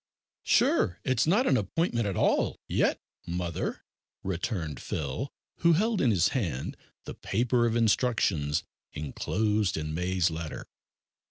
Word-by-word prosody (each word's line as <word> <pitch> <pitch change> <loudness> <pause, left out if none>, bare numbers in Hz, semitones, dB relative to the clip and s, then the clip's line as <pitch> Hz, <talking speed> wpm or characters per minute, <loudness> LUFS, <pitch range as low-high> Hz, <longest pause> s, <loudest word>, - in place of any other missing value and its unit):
"Sure 85 -1 +3
it's 130 +1 +1
not 210 +10 +4
an - - +4
appointment 120 - 0
at 100 - -2
all - - +2
yet, - - +1 0.3
mother," 85 -1 -3 0.4
returned 85 - -3
Phil, 80 - -3 0.3
who 170 0 +4
held 215 +5 +2
in 130 - +4
his 95 -4 +3
hand 85 - -2 0.3
the - - -6
paper 120 +3 +1
of 115 - 0
instructions 105 - +2 0.3
enclosed 105 +7 0
in 75 0 -3
May's 90 +1 +1
letter. 80 -1 -5
100 Hz, 125 wpm, -28 LUFS, 85-120 Hz, 0.4 s, not